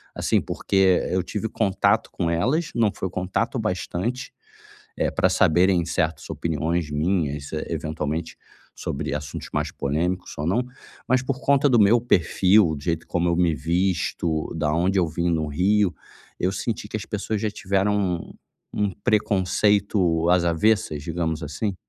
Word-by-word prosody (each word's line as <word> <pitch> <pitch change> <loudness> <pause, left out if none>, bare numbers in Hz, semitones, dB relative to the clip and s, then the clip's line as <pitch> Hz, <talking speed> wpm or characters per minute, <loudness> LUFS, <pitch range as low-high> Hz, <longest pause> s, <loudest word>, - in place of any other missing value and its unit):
assim, - - +1
porque 95 -2 +2
eu 90 -1 +1
tive 105 +3 -4
contato 100 0 +1
com 85 -3 -1
elas, 130 - 0
não 110 -3 +3
foi 95 - -4
contato 95 +8 -2
o 125 - 0
bastante, 110 +5 -3 0.7
eh, - - +1
pra - - +2
saberem 90 -1 +3
certas 80 -3 -1
opiniões 80 0 -2
minhas, 75 -2 -1
eh, 75 - -2
eventualmente 80 0 -3 0.4
sobre 70 +1 -4
assuntos 75 -1 -6
mais - - -1
polêmicos 85 +6 -2
ou 75 - -2
não, 110 +8 +1 0.4
mas 130 0 +3
por 130 0 -2
conta 140 +1 +4
do 125 -3 +4
meu 110 +3 +5
perfil, 95 -4 +3
do 70 - -10
jeito 85 -2 -2
como 85 0 0
eu 85 - +1
me 85 -3 +2
visto, 85 -1 -1
da 75 -1 0
onde 95 +3 +1
eu 85 - +3
vim 85 +2 -1
no 80 -2 0
Rio, 95 +5 +2 0.5
eu 90 - +1
senti 105 +2 -3
que 110 - -4
as 110 - -5
pessoas 105 0 -3
já 110 - 0
tiveram 100 0 0
um 90 -4 -2 0.4
um 105 -1 0
preconceito 100 -4 +2
às 90 -1 +4
avessas, 85 -3 +1
digamos 80 0 -2
assim. 80 +7 -3
90 Hz, 160 wpm, -24 LUFS, 80-105 Hz, 0.7 s, meu